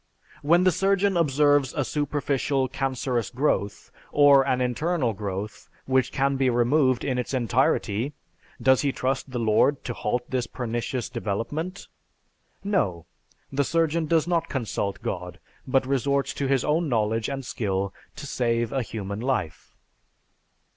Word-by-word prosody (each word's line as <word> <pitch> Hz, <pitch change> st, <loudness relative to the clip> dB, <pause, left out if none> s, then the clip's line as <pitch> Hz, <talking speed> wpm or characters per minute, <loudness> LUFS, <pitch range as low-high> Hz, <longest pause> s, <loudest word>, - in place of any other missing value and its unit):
When 170 Hz, +5 st, +4 dB
the 185 Hz, -, +5 dB
surgeon 195 Hz, +1 st, +2 dB
observes 145 Hz, -4 st, +3 dB
a 145 Hz, -, 0 dB
superficial 140 Hz, -2 st, 0 dB
cancerous 130 Hz, -3 st, -2 dB
growth, 125 Hz, -6 st, -1 dB, 0.2 s
or 145 Hz, -1 st, +6 dB
an 130 Hz, -, +1 dB
internal 125 Hz, +1 st, 0 dB
growth 100 Hz, +1 st, -6 dB, 0.2 s
which 130 Hz, -1 st, +1 dB
can 135 Hz, 0 st, +1 dB
be 135 Hz, -1 st, +2 dB
removed 125 Hz, +2 st, +2 dB
in 130 Hz, -2 st, -1 dB
its 125 Hz, +2 st, -3 dB
entirety, 120 Hz, 0 st, +1 dB, 0.5 s
does 130 Hz, -1 st, +4 dB
he 140 Hz, -, +1 dB
trust 130 Hz, 0 st, -1 dB
to 135 Hz, -, -17 dB
the -, -, -1 dB
Lord 115 Hz, +5 st, +2 dB
to 120 Hz, -, -4 dB
halt 120 Hz, +3 st, -2 dB
this 125 Hz, -2 st, -2 dB
pernicious 120 Hz, 0 st, -3 dB
development? 125 Hz, -, -4 dB, 0.8 s
No, 100 Hz, -, 0 dB, 0.5 s
the 140 Hz, +1 st, +1 dB
surgeon 165 Hz, +1 st, +1 dB
does 165 Hz, 0 st, +2 dB
not 170 Hz, -2 st, 0 dB
consult 110 Hz, -6 st, -3 dB
God, -, -, -4 dB, 0.3 s
but 130 Hz, 0 st, +2 dB
resorts 140 Hz, +1 st, 0 dB
to 140 Hz, -, -2 dB
his 135 Hz, -2 st, +1 dB
own 155 Hz, +1 st, +1 dB
knowledge 110 Hz, -1 st, 0 dB
and 135 Hz, -1 st, -4 dB
skill 100 Hz, -4 st, -2 dB, 0.2 s
to 145 Hz, -, -8 dB
save 120 Hz, -4 st, 0 dB
a 135 Hz, -, +1 dB
human 100 Hz, -3 st, -5 dB
life. 120 Hz, -, -3 dB
130 Hz, 145 wpm, -25 LUFS, 120-145 Hz, 0.8 s, or